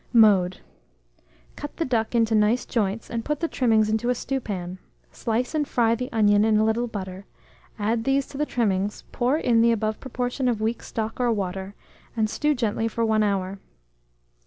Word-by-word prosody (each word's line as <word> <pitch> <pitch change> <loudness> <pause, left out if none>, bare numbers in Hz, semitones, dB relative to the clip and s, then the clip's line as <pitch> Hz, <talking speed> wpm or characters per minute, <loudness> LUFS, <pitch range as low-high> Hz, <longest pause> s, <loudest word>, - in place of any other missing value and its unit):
Mode. 200 -6 +5 0.9
Cut 290 - -8
the 330 - 0
duck 235 -2 0
into 225 -1 +3
nice 215 +3 +3
joints, 215 -1 -1
and 230 -1 -3
put 300 +2 -2
the 335 - 0
trimmings 225 -7 +2
into 220 +3 0
a 250 - +2
stewpan; 195 -9 -4 0.3
slice 235 +4 -2
and 300 -2 0
fry 230 -4 +2
the 250 +2 -3
onion 205 -2 +4
in 220 -1 +3
a 215 - +3
little 230 +2 +1
butter; 190 -3 -7 0.5
add 225 +2 0
these 270 +1 +1
to 275 - -8
the 300 - 0
trimmings, 205 -3 -1
pour 255 +4 +1
in 235 -7 +3
the 235 0 +5
above 215 -1 -1
proportion 250 0 -2
of 235 -3 +1
weak 225 +2 -1
stock 225 +1 -4
or 245 -1 +2
water, 195 -1 -3 0.4
and 215 -1 +1
stew 300 0 +1
gently 225 -2 0
for 230 0 -1
1 220 -1 +2
hour. 195 -2 -1
225 Hz, 185 wpm, -25 LUFS, 210-245 Hz, 0.9 s, Mode